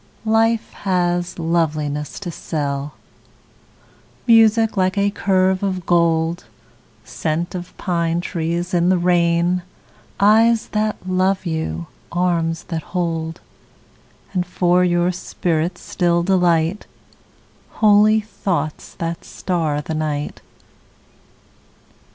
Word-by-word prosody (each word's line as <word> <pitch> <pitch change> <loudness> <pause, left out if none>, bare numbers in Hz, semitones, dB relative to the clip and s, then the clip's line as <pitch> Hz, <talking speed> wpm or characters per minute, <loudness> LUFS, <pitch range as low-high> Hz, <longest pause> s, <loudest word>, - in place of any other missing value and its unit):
Life 225 +1 +2
has 175 -2 -1
loveliness 155 -3 -1
to 175 -3 -4
sell, 145 -2 -3 1.3
Music 225 -1 +5
like 185 0 +1
a 200 0 +2
curve 190 -2 +1
of 185 -3 -2
gold, 170 0 +1 0.6
Scent 165 +2 -3
of 180 -1 -7
pine 170 -2 0
trees 170 0 -3
in 175 0 +3
the 185 - +4
rain, 175 0 +2 0.6
Eyes 220 +3 +4
that 215 0 0
love 185 +1 +1
you, 160 - -3 0.3
arms 170 -2 0
that 165 -2 -2
hold, 165 -2 -3 0.9
And 180 -2 +1
for 180 0 +2
your 175 0 +2
spirit's 175 -1 -2
still 170 -1 +1
delight, 175 0 +1 0.9
Holy 215 +1 +5
thoughts 175 -7 -3
that 165 0 -4
star 160 -5 -2
the 160 - -5
night. 150 -2 -3
175 Hz, 100 wpm, -20 LUFS, 165-190 Hz, 1.3 s, Music